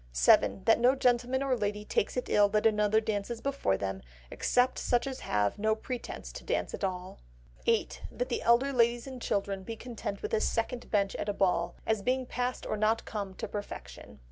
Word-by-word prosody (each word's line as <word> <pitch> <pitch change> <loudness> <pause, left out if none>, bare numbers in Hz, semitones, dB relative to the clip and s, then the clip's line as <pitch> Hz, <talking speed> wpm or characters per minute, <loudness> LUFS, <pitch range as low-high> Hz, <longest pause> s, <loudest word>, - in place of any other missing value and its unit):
7. - - +4
That 225 +2 +4
no 250 +3 +5
gentleman 250 +1 +2
or 270 -2 +1
lady 210 -2 -2
takes 210 - 0
it 250 - -2
ill 205 -1 +4
that 210 +1 +1
another 210 0 +4
dances 220 +1 -3
before 275 - 0
them; 95 -1 -3 0.3
except 250 +1 +1
such 245 +1 +1
as 265 -1 -4
have 105 - 0
no 215 +1 +2
pretence 245 +2 -6
to - - -9
dance - - -1
at - - -6
all. 185 -1 -3 0.5
8. - - +1
That 245 - -3
the 240 - -1
elder 245 +4 +3
ladies 235 -1 +2
and 260 -2 -8
children 195 -2 -1
be 225 +4 -6
content 225 -3 -6
with - - -4
a 215 - +2
second 235 +2 -1
bench 200 -2 +1
at 205 - -3
a - - 0
ball, 195 -2 +1
as 220 -2 +1
being 255 +4 0
past 250 0 -3
or 215 - -2
not 220 +2 +1
come 200 -3 -5
to - - -5
perfection. 205 -1 -8
220 Hz, 200 wpm, -30 LUFS, 205-245 Hz, 0.5 s, no